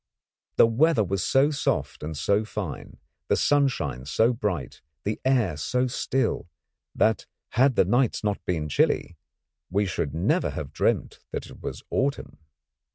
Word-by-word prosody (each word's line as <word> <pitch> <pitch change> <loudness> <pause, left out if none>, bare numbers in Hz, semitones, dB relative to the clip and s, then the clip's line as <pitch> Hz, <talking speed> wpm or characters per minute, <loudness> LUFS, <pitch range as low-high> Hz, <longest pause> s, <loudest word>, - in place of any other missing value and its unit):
The - - +7
weather 120 +3 +3
was 95 -1 -1
so 140 +3 +3
soft 145 -1 -1
and 75 0 -5
so 100 +7 +2
fine, 105 -7 -6 0.3
the - - +3
sunshine 115 - +1
so 115 +10 +3
bright, 100 - -3 0.2
the 105 +1 -2
air 120 - +2
so 125 - 0
still, 130 -6 -1 0.5
that 110 -1 +2 0.2
had 130 +1 +3
not - - +6
the - - -5
nights 125 0 +2 0.3
been 80 -4 -1
chilly 75 - +1 0.5
we 100 +3 +1
should 80 -6 -2
never 85 - +1
have 75 -2 -6
dreamt - - 0
that - - -4
it - - -13
was - - -6
autumn. 140 - -1
110 Hz, 150 wpm, -26 LUFS, 85-130 Hz, 0.5 s, The